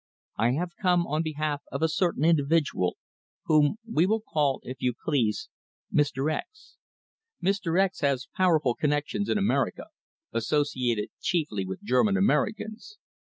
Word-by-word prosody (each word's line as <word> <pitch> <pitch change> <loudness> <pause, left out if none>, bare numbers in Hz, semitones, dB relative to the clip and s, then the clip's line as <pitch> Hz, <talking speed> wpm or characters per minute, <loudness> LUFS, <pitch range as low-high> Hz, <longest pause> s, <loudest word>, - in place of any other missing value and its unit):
I 120 +2 +2
have 175 +4 -3
come 180 -3 +3
on 155 +1 -1
behalf 155 -2 -2
of - - -2
a - - +5
certain 160 -1 0
individual 150 - +2 0.5
whom 150 +2 +4
we 180 -6 +2
will 220 +2 +2
call, 145 -3 +1
if 130 +1 -8
you 125 -1 +1
please, 120 -9 0 0.5
Mr. 145 0 +1
X. 425 - -8 0.6
Mr. 190 -2 +1
X 190 -1 +1
has 140 -4 0
powerful 160 -9 +3
connections 150 +9 -1
in - - +2
America, 205 +1 0 0.4
associated 125 -3 0
chiefly 145 - -1
with 95 0 -6
German 130 - +3
Americans. 220 - -1
155 Hz, 135 wpm, -27 LUFS, 135-185 Hz, 0.6 s, a